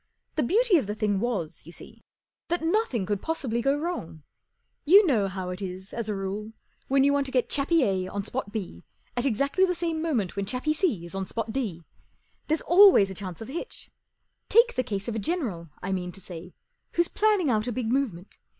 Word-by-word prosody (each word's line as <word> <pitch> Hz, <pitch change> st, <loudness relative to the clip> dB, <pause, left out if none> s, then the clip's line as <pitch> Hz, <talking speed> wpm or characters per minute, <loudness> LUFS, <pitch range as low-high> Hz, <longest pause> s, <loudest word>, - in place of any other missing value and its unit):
The 310 Hz, -, 0 dB
beauty 415 Hz, -, +4 dB
of 270 Hz, -, -1 dB
the 210 Hz, -, -3 dB
thing 210 Hz, -2 st, 0 dB
was, 210 Hz, -9 st, -2 dB
you -, -, -9 dB
see, -, -, -11 dB, 0.5 s
that 345 Hz, -1 st, -1 dB
nothing 325 Hz, -, +1 dB
could 205 Hz, 0 st, -2 dB
possihly 260 Hz, -8 st, -2 dB
go 275 Hz, +3 st, +2 dB
wrong. 295 Hz, -, -5 dB, 0.6 s
You 380 Hz, +7 st, +8 dB
t\ -, -, 0 dB
know 220 Hz, -9 st, +2 dB
how 185 Hz, -1 st, -4 dB
it 180 Hz, +2 st, -6 dB
is, 190 Hz, 0 st, -7 dB
as 230 Hz, -2 st, -3 dB
a 210 Hz, -, -1 dB
rule, 200 Hz, +3 st, -4 dB, 0.3 s
when 270 Hz, 0 st, +3 dB
you 280 Hz, -, +4 dB
%vant 280 Hz, -1 st, +1 dB
to -, -, -7 dB
get 250 Hz, -2 st, +1 dB
Chappie 295 Hz, +2 st, +3 dB
A 190 Hz, -4 st, 0 dB
on 200 Hz, +1 st, -4 dB
Spot 245 Hz, -1 st, -4 dB
B 190 Hz, -, -6 dB, 0.3 s
at 245 Hz, +3 st, +1 dB
exactly 275 Hz, -, +1 dB
the 360 Hz, -1 st, +2 dB
same 330 Hz, -2 st, -2 dB
moment 250 Hz, -, 0 dB
w 200 Hz, -, -3 dB
hen 195 Hz, -, -4 dB
Chappie 260 Hz, +6 st, 0 dB
C 300 Hz, -, 0 dB
is 170 Hz, -, -10 dB
on 195 Hz, -1 st, -3 dB
Spot 225 Hz, -1 st, -3 dB
D, 205 Hz, -11 st, -3 dB, 0.6 s
There's 315 Hz, +1 st, +1 dB
always 350 Hz, -, +7 dB
a -, -, -4 dB
chance 185 Hz, -2 st, -6 dB
of 225 Hz, -, -7 dB
a -, -, -7 dB
hitch. 340 Hz, +9 st, -7 dB, 0.6 s
Take 470 Hz, +2 st, +5 dB
the -, -, +1 dB
case 205 Hz, -4 st, -4 dB
of 235 Hz, -, -2 dB
a 220 Hz, -, -2 dB
general, 205 Hz, -, -2 dB
I 190 Hz, -, -2 dB
mean 180 Hz, -1 st, -2 dB
to -, -, -11 dB
say, 180 Hz, -1 st, -10 dB, 0.4 s
who's 345 Hz, 0 st, +2 dB
plan¬ 430 Hz, +2 st, +2 dB
ning 325 Hz, -9 st, +1 dB
out 215 Hz, 0 st, 0 dB
a -, -, -1 dB
big 230 Hz, -1 st, -2 dB
movement. 220 Hz, -9 st, -2 dB
235 Hz, 225 wpm, -27 LUFS, 195-310 Hz, 0.6 s, You